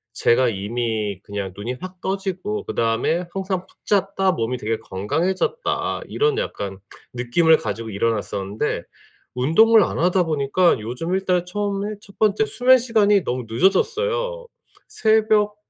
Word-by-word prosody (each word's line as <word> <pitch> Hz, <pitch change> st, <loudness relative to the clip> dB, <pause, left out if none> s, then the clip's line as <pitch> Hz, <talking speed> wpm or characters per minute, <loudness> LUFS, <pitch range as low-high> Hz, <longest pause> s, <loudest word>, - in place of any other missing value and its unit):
제가 125 Hz, +2 st, +3 dB
이미 110 Hz, -1 st, -2 dB
그냥 100 Hz, -2 st, -5 dB
눈이 120 Hz, +5 st, -4 dB
확 185 Hz, 0 st, -8 dB
떠지고 195 Hz, +2 st, -3 dB
그다음에 115 Hz, +10 st, 0 dB
항상 190 Hz, -1 st, -3 dB
'푹 -, -, -27 dB
잤다. 195 Hz, -1 st, +1 dB
몸이 115 Hz, 0 st, -2 dB
되게 110 Hz, 0 st, -2 dB
건강해졌다.' 165 Hz, -, -2 dB
이런 435 Hz, -1 st, +1 dB
약간 100 Hz, -, -4 dB, 0.4 s
느낌을 155 Hz, +7 st, +3 dB
가지고 110 Hz, +1 st, -5 dB
일어났었는데 105 Hz, -1 st, -2 dB, 0.5 s
운동을 205 Hz, -, +5 dB
안 -, -, -3 dB
하다 180 Hz, +2 st, +3 dB
보니까 160 Hz, +2 st, +2 dB
요즘 125 Hz, +11 st, -4 dB
일단 180 Hz, -2 st, 0 dB
처음에 205 Hz, +2 st, -2 dB
첫 200 Hz, -1 st, -18 dB
번째 215 Hz, 0 st, +3 dB
수면 255 Hz, +3 st, +4 dB
시간이 215 Hz, -5 st, +3 dB
너무 125 Hz, -2 st, -3 dB
늦어졌어요. 485 Hz, -, +1 dB, 0.4 s
새벽 215 Hz, -2 st, +2 dB
180 Hz, 300 characters per minute, -22 LUFS, -, 0.5 s, 운동을